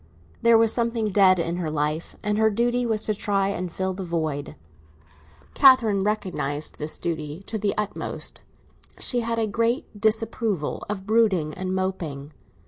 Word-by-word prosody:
There 235 -1 +6
was 225 -1 +3
something 230 -3 0
dead 190 -1 +5
in 170 0 -1
her 170 -3 -2
life, 150 +2 -2
and 210 0 0
her 220 0 +5
duty 240 +3 +1
was 220 -1 -1
to 215 - +1
try 200 -1 0
and 180 -3 -3
fill 190 +2 -2
the 190 +1 -5
void. 155 -5 -3 1.0
Catherine 235 -8 +5
recognised 180 -8 -2
this 150 0 -2
duty 160 +1 -4
to 220 - -4
the 205 -1 0
utmost; 210 -1 -3 0.6
she 245 - 0
had 230 0 -2
a 225 - +2
great 230 0 -1
disapproval 220 -5 0
of 195 -2 -4
brooding 200 -8 +2
and 185 +2 -3
moping. 160 -7 -3
200 Hz, 155 wpm, -24 LUFS, 170-225 Hz, 1.0 s, There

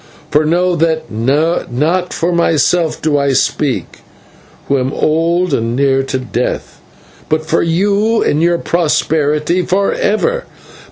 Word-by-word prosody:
For 150 +1 +3
know 175 +3 +1
that 160 -1 0
not 150 +7 0
for 170 +2 -1
myself 165 0 +1
do 150 -2 +2
I 140 -1 +1
speak, 135 +1 -1 0.7
who 140 -1 +1
am 130 +1 -1
old 165 +3 0
and 115 -1 -1
near 135 0 +2
to 135 0 -3
death, 125 -1 -4 0.5
but 155 0 0
for 155 - +1
you 200 +6 +1
and 150 - +1
your 170 0 +2
posterity 155 0 0
for 195 +3 0
ever. 475 - 0
160 Hz, 130 wpm, -14 LUFS, 140-175 Hz, 0.7 s, For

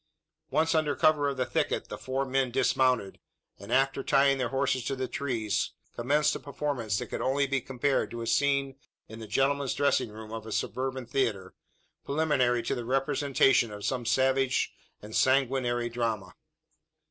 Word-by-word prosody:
Once 160 +2 +2
under 155 -3 +1
cover 150 -2 +3
of 140 - -4
the 130 - 0
thicket, - - -1
the - - -5
four 135 +1 -2
men 135 -1 0
dismounted; 125 -4 +1 0.4
and, 100 +3 -10
after 135 +1 +2
tying 135 0 +3
their 125 -2 0
horses 135 -1 0
to 135 - -2
the 130 -1 -3
trees, 115 -8 -2 0.2
commenced 150 +5 +2
a - - -4
performance 135 -7 -2
that - - -3
could - - -5
only 140 +2 +1
be 135 -1 -1
compared 135 +2 0
to 120 0 -6
a - - -4
scene 140 +1 +1 0.3
in 110 +1 -10
the 110 - -8
gentlemen's 135 +4 +1
dressing 140 -4 +1
room 110 +1 -10
of 110 -1 -6
a - - -7
suburban 130 +3 -2
theatre, 110 -8 -1 0.5
preliminary 140 -5 +1
to - - -1
the 120 - -3
representation 135 -1 +2
of 105 -1 -7
some 125 -2 -1
savage 130 +2 +1 0.3
and 105 +1 -8
sanguinary 130 -2 +2
drama. 115 -6 -3
130 Hz, 170 wpm, -28 LUFS, 120-140 Hz, 0.5 s, cover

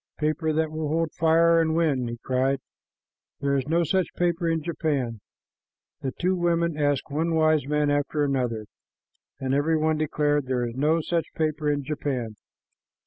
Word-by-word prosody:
"Paper 155 +1 0
that 155 0 0
will 155 -1 -3
hold 160 +1 0
fire 165 +1 +4
and 160 -1 +1
wind!" 140 -7 +1
he 120 - -5
cried. 130 +1 +1 0.8
"There 140 0 +1
is 135 0 -1
no 170 +2 +2
such 185 +3 0
paper 170 -1 0
in 165 -1 0
Japan." 145 -9 -2 0.8
The 135 - -2
two 185 +2 +2
women 170 -2 +1
asked 145 -1 0
one 165 +3 0
wise 155 -3 +3
man 150 0 +1
after 145 +1 0
another, 125 -6 -1 0.7
and 135 -1 -1
every 155 +3 +2
one 155 0 +1
declared, 145 -2 +1
"There 125 -2 0
is 120 - -5
no 150 +6 +2
such 165 +1 -1
paper 155 -1 0
in 145 -1 0
Japan." 130 -6 -3
150 Hz, 165 wpm, -25 LUFS, 140-165 Hz, 0.8 s, fire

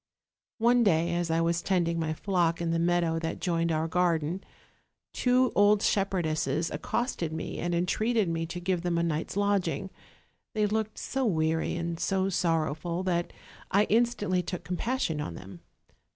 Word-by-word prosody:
"One 240 +1 +4
day 170 -4 +2
as 175 -1 -1
I 165 +1 +2
was 170 0 +1
tending 170 -3 +1
my 160 -1 -1
flock 175 -3 +1
in 170 -1 -1
the 165 - +1
meadow 170 -1 +1
that 165 0 -4
joined 170 -2 0
our 160 0 0
garden 170 0 0 0.7
two 250 0 +3
old 205 0 +4
shepherdesses 165 -5 0
accosted 240 -9 -2
me, 160 0 -5
and 175 0 -1
entreated 215 +5 +1
me 165 0 -2
to 175 - -5
give 180 -1 -1
them 175 -1 0
a 170 - +1
night's 165 +3 -2
lodging: 195 -2 0 0.6
they 210 -1 +2
looked 215 +1 -1
so 270 0 -2
weary 160 -3 0
and 170 -1 -3
so 190 0 +1
sorrowful 170 -1 0
that 175 -2 -1 0.4
I 200 +2 +4
instantly 210 -5 +2
took 180 0 -5
compassion 180 - -1
on 85 - -5
them. 95 -1 -10
175 Hz, 160 wpm, -28 LUFS, 165-200 Hz, 0.7 s, One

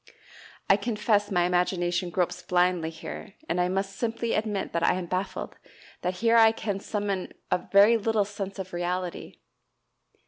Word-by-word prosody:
I 195 - +6
confess 210 -1 +1
my 180 -3 +2
imagination 175 0 0
gropes 175 +1 -1
blindly 180 -2 +1
here, 165 +4 -8
and 180 - 0
I 180 - +1
must 195 +1 -2
simply 230 0 -1
admit 210 -2 -1
that 170 - 0
I 170 - +3
am 185 -1 -3
baffled, 185 +3 -4 0.4
that 180 +1 -1
here 230 0 +5
I 225 -1 +7
can 205 -3 -3
summon 205 -2 -3 0.2
up - - -1
very 205 +4 +7
little 220 -1 +1
sense 200 -1 -6
of 185 -1 -6
reality. 175 0 -4
195 Hz, 160 wpm, -27 LUFS, 180-210 Hz, 0.4 s, I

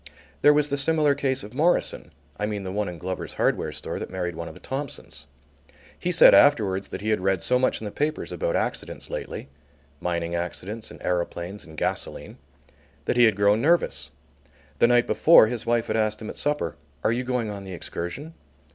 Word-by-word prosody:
There 145 - +7
was 150 0 +2
the 140 - 0
similar 150 +1 +3
case 135 -2 -1
of 105 +3 -10
Morison 165 +6 +1 0.3
(I 105 - 0
mean 105 -2 -3
the 95 - -5
one 105 0 -1
in 90 - -7
Glover's 95 +2 -5
hardware - - 0
store - - -5
that - - -6
married 90 -2 -3
one 85 0 -5
of - - -9
the - - -12
Thompsons). 135 0 -6 0.7
He 180 - -1
said 170 - +8
afterwards 100 -9 +4
that - - -6
he 110 - -2
had 110 -3 +1
read 95 -2 +1
so 125 +6 +3
much 130 - +1
in 110 - -7
the 105 - -4
papers 150 -2 -2
about 85 -1 -1
accidents - - -3
lately, - - -5 0.5
mining 85 -1 -2
accidents, 95 +6 -4
and - - -12
aeroplanes 90 +2 -3
and 80 -2 -13
gasoline, - - -3 0.7
that - - 0
he 120 0 +6
had 110 -4 +3
grown 100 +2 +3
nervous. 135 - +1 0.7
The - - +6
night 120 0 +4
before 165 -7 +6
his 115 0 -4
wife 120 -1 +2
had - - -1
asked 110 -1 0
him 110 - -6
at - - -12
supper: 145 - -1 0.3
"Are - - +3
you 120 +2 -1
going 125 -4 -1
on 100 -1 -7
the 95 -1 -8
excursion?" 90 - -6
110 Hz, 200 wpm, -25 LUFS, 95-135 Hz, 0.7 s, said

